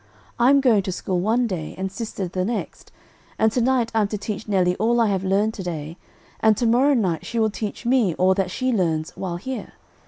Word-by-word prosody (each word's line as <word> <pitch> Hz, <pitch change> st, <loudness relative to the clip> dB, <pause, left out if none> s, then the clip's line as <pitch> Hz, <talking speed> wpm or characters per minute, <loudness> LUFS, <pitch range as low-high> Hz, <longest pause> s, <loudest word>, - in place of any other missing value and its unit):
I'm 270 Hz, +4 st, +5 dB
going 235 Hz, -6 st, +4 dB
to 185 Hz, -, -4 dB
school 180 Hz, 0 st, -2 dB
one 225 Hz, +6 st, +1 dB
day, 180 Hz, -8 st, -4 dB
and 190 Hz, 0 st, -3 dB
sister 205 Hz, -3 st, -4 dB
the 185 Hz, +1 st, -2 dB
next, 230 Hz, +5 st, -4 dB, 0.5 s
and 220 Hz, 0 st, +3 dB
to 245 Hz, -, 0 dB
night 245 Hz, -2 st, +1 dB
I'm 220 Hz, -2 st, +2 dB
to 210 Hz, -, -4 dB
teach 210 Hz, +1 st, -5 dB
Nelly 185 Hz, -3 st, +2 dB
all 235 Hz, +2 st, +2 dB
I 230 Hz, -, +4 dB
have 190 Hz, -2 st, -1 dB
learned 200 Hz, +3 st, +1 dB
to 200 Hz, -, -6 dB
day, 160 Hz, -2 st, -5 dB, 0.4 s
and 220 Hz, -2 st, +4 dB
to 240 Hz, -, 0 dB
morrow 255 Hz, +5 st, +4 dB
night 185 Hz, -9 st, 0 dB
she 235 Hz, -, -5 dB
will 220 Hz, -1 st, +2 dB
teach 210 Hz, +1 st, -5 dB
me 240 Hz, -9 st, +2 dB
all 185 Hz, +1 st, +3 dB
that 190 Hz, -1 st, -1 dB
she 255 Hz, +7 st, -1 dB
learns 165 Hz, -6 st, 0 dB
while 180 Hz, -3 st, -5 dB
here. 260 Hz, +8 st, -6 dB
210 Hz, 220 wpm, -23 LUFS, 185-235 Hz, 0.5 s, I'm